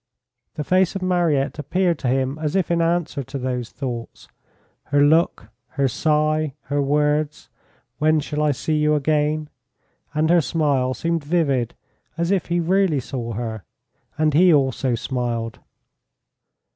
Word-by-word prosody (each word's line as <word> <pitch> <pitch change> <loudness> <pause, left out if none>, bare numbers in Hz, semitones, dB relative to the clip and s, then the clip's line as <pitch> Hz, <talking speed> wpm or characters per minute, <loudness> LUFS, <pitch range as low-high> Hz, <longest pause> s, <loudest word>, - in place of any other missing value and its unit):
The 150 - -3
face 185 +3 +2
of 195 - -3
Mariette 170 -7 +1
appeared 175 +3 0
to 130 - -2
him 135 +3 0
as 155 +1 -2
if 185 -3 +1
in 170 0 +2
answer 165 -3 0
to 135 +2 -6
those 125 -2 -3
thoughts 125 -3 -6 0.6
her 145 0 +3
look, 155 -7 +2 0.3
her 140 -1 +3
sigh, 155 +1 +1
her 145 +1 -1
words, 150 +1 0 0.5
"When 155 +1 +3
shall 150 +1 -3
I 150 - +3
see 155 +3 -1
you 150 0 +3
again?" 150 +1 0 0.7
and 155 +2 +2
her 175 -1 +5
smile 135 -3 0
seemed 165 -2 -1
vivid 145 -7 0 0.4
as 170 +2 0
if 195 -3 0
he 175 0 0
really 180 -2 +2
saw 120 -2 -5
her, 110 -2 -4 0.5
and 155 -1 +2
he 175 +4 +6
also 130 -4 +2
smiled. 115 -2 -3
150 Hz, 145 wpm, -22 LUFS, 135-165 Hz, 0.7 s, he